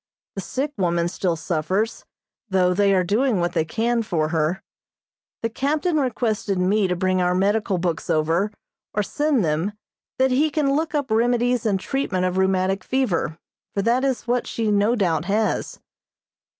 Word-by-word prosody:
The 195 - -4
sick 275 +9 -3
woman 170 -2 +1
still 175 0 -1
suffers, 185 +7 -2 0.4
though 180 -2 +3
they 200 +1 +3
are 185 - +3
doing 220 +5 +1
what 175 0 0
they - - +2
can 230 +8 0
for 165 -8 -1
her. 160 +2 0 0.8
The 230 - +1
captain 305 +7 0
requested 225 -7 0
me 195 +2 +2
to 180 - 0
bring 185 +1 +1
our 180 0 +2
medical 200 0 +1
books 170 -1 -2
over, 165 +5 +1 0.5
or 210 - +2
send 290 - +1
them, 160 +6 -1 0.4
that 260 0 +3
he 290 +5 +3
can 285 -2 +1
look 315 +1 -1
up 285 -5 -1
remedies 240 +1 +2
and 195 -3 +1
treatment 190 -6 -1
of 185 +1 0
rheumatic 190 0 +1
fever, 185 - -1 0.4
for 200 - 0
that 240 +4 +2
is 265 -3 -1
what 245 +1 0
she 225 -2 -1
no 205 +3 +3
doubt 170 -7 0
has. 215 +3 -1
200 Hz, 165 wpm, -23 LUFS, 180-245 Hz, 0.8 s, though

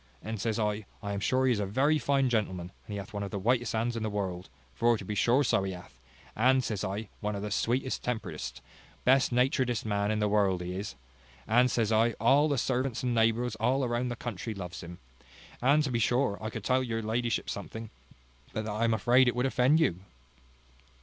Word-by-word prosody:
And, 110 -2 -4
says 110 -1 -1
I, 105 -2 -1 0.2
I 100 0 -3
am 100 - -2
sure 130 +5 +1
he 130 - +4
is 115 - +1
a 100 - 0
very 140 +9 +2
fine 140 -2 +2
gentleman; 95 -7 -1 0.2
and - - -9
he - - -3
hath 100 +1 -8
one 100 - -3
of 100 - -3
the 100 - -4
whitest 120 +4 +1
hands 115 +2 0
in 115 - -3
the 110 - -1
world; 95 -3 -4 0.2
for 120 - +2
to 100 - -8
be 105 - -3
sure 120 +7 +3
so 115 - +2
he 95 0 -3
hath: 90 -8 -12 0.4
and, 130 +3 +4
says 105 -5 -3
I, 100 +2 -4
one 105 -1 -2
of 100 - -4
the 105 - -4
sweetest 125 +6 0
temperedest, 125 -3 -4 0.4
best 130 +1 +4
naturedest 125 -2 +1
men 100 -1 0
in 110 - 0
the 105 0 +1
world 100 -3 +2
he 90 +1 -4
is; 95 - -5 0.5
and, 125 +3 +4
says 115 -3 0
I, 115 +1 +3
all 135 +8 +4
the 140 - +1
servants 125 0 -1
and 125 -1 0
neighbours 115 +1 +2
all 125 +4 +1
round 120 +1 -1
the 120 - -3
country 115 -1 -5
loves 90 -2 -7
him. 85 0 -9 0.6
And, 140 +5 +4
to 140 - -2
be 120 - 0
sure, 120 -2 +1
I 110 - -3
could 110 -3 -6
tell 130 +3 +2
your 115 -3 -2
ladyship 115 +1 -1
something, 110 +2 -6 0.6
but 110 - -3
that 110 - -3
I 110 +3 0
am 115 -1 +2
afraid 125 +3 +4
it 120 - +1
would 125 +1 +1
offend 130 +4 +3
you." 95 - +1
115 Hz, 225 wpm, -29 LUFS, 105-125 Hz, 0.6 s, he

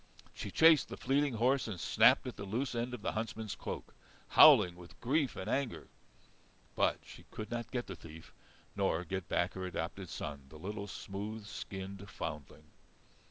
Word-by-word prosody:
She 100 - -6
chased 160 - +6
the - - -6
fleeting 140 -1 +1
horse 125 +4 +2
and 100 -5 -5
snapped - - +5
at - - -5
the - - -7
loose 115 +8 -2
end 120 +1 -2
of 110 - -12
the - - 0
huntsman's 110 -1 -4
cloak, - - -6 0.4
howling 90 -1 +8
with 90 0 -14
grief 135 +2 +1
and 95 - -5
anger. 135 +1 -2 0.9
But - - +2
she - - -13
could 110 0 -7
not 120 -1 -3
get 125 -2 -2
the 95 - -7
thief, 80 -1 -12 0.4
nor 80 +2 +1
get 95 +2 -4
back 85 - +1
her 95 - -5
adopted 90 +1 -4
son, 70 -4 -6
the 80 - -12
little 100 +5 -5
smooth 100 +2 -6
skinned 100 -1 -7
foundling. 75 -1 -6
100 Hz, 170 wpm, -34 LUFS, 90-120 Hz, 0.9 s, howling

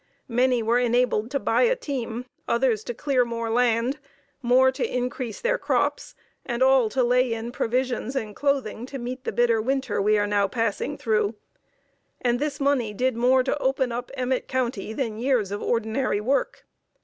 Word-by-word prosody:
Many 250 0 +2
were 235 +2 +2
enabled 245 -2 +1
to 280 - -1
buy - - +1
a - - +4
team, 250 - -4 0.2
others 235 -3 +1
to 240 - -3
clear 270 -2 +1
more 230 -1 -3
land, 240 +3 +1 0.4
more 260 +1 +4
to 260 - -3
increase 250 -2 -3
their - - 0
crops, - - -1 0.3
and 240 0 -1
all 260 -4 +4
to 255 +3 +1
lay 250 0 +3
in 225 +1 -5
provisions 250 +1 -1
and 215 -5 -3
clothing 265 -5 -1
to 275 - -6
meet 255 +1 -6
the - - -1
bitter 230 0 +2
winter 265 -1 -1
we 210 +1 +3
are 205 - +2
now 205 -1 +2
passing 230 +6 -2
through, 215 -1 0 0.8
and 245 -1 +1
this 290 -1 -2
money 270 -7 +1
did 255 +2 0
more 255 +2 +3
to 265 - 0
open 265 -2 0
up 245 +1 -4
Emmett 255 -1 -1
County 240 -6 -2
than 220 -3 -3
years 240 -6 +1
of 205 - -3
ordinary 230 0 0
work. 260 +7 -1
245 Hz, 175 wpm, -25 LUFS, 225-260 Hz, 0.8 s, a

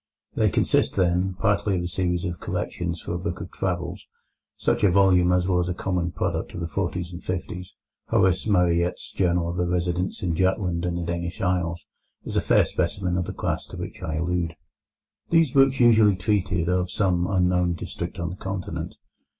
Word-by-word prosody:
They - - +2
consist, - - +2
then, 90 0 +1
partly 100 -1 +1
of 90 - -2
a - - -2
series 90 0 -1
of 90 -2 -4
collections 85 -1 -3
for 85 - -5
a 85 - -2
book 90 +1 -4
of 85 +1 -7
travels, 90 -2 -3 0.5
such - - 0
a 100 - +6
volume 90 -1 +4
as 90 0 +2
was 90 -1 +1
a 90 - -2
common 90 -2 -1
product - - -2
of - - -4
the 85 - -2
forties 90 -1 -3
and 85 +1 -9
fifties. 90 0 -5 0.3
Horace 95 +2 +2
Marryat's 90 -3 +1
Journal 90 -2 +1
of 85 +1 -3
a 90 - +1
Residence 90 +1 -1
in 90 -2 0
Jutland 90 -1 0
and 85 -1 -1
the 85 - -2
Danish 85 0 -3
Isles 90 -2 -1 0.4
is - - -5
a - - +3
fair - - +4
specimen 90 0 -1
of 90 -1 0
the - - -4
class - - -2
to - - -9
which - - -7
I 80 - -3
allude. 85 +1 -1 0.7
These 165 -5 +4
books 135 0 +4
usually 110 -4 +6
treated 90 -3 0
of 90 0 +1
some 90 -2 +1
unknown 90 -2 +2
district - - -6
on 85 0 -3
the 90 - -8
Continent. 95 -1 -5
90 Hz, 190 wpm, -25 LUFS, 85-95 Hz, 0.7 s, a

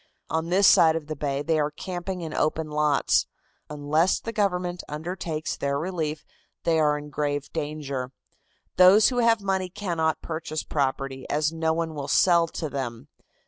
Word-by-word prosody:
On 160 +1 -1
this 195 +3 +4
side 160 -3 +6
of 165 -2 -3
the 155 +1 -5
bay 140 -1 -2
they 160 0 +1
are 150 0 +1
camping 180 +3 -5
in 160 -2 -5
open 155 0 -1
lots. 150 -1 +2 0.4
Unless 150 +4 +1
the 230 - -5
government 180 -4 -1
undertakes 160 0 -4
their 140 0 -1
relief, 155 -2 -3 0.4
they 165 -1 +2
are 150 -1 +3
in 150 0 -9
grave 145 0 -2
danger. 145 -5 -4 0.7
Those 190 +4 +7
who 250 -2 -1
have 230 -2 +3
money 190 -1 -1
cannot 170 -5 -2
purchase 155 -1 -4
property, 135 -2 -2
as 150 +2 0
no 160 0 0
one 165 -1 -2
will 145 -2 -5
sell 170 +2 +4
to 160 0 -4
them. 130 -2 -5
160 Hz, 165 wpm, -25 LUFS, 145-175 Hz, 0.7 s, Those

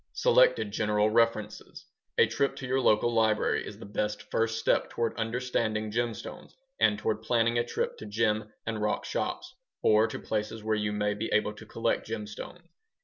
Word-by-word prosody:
Selected - - +4
general 105 - +1
references 110 -2 0 0.3
A - - +7
trip 140 - 0
to 135 - -6
your 130 +1 +1
local 120 0 +3
library 110 -1 +2
is - - -8
the - - -10
best 105 +1 -2
first 115 0 +1
step 115 - +1
toward 115 -1 -2
understanding 115 -2 -1
gemstones 120 0 -4 0.2
and - - +4
toward 445 0 -1
planning 120 0 +2
a - - +2
trip 120 - -3
to 110 - -8
gem 110 0 0
and 110 -1 -3
rock 105 0 0
shops - - -3 0.3
or 110 +1 +5
to - - -5
places 110 0 -3
where 110 0 0
you 105 -1 -1
may 105 0 0
be 105 +2 -3
able 105 0 +2
to 110 +1 -13
collect 115 0 -1
gemstones. 110 +10 -7
110 Hz, 175 wpm, -29 LUFS, 105-115 Hz, 0.3 s, A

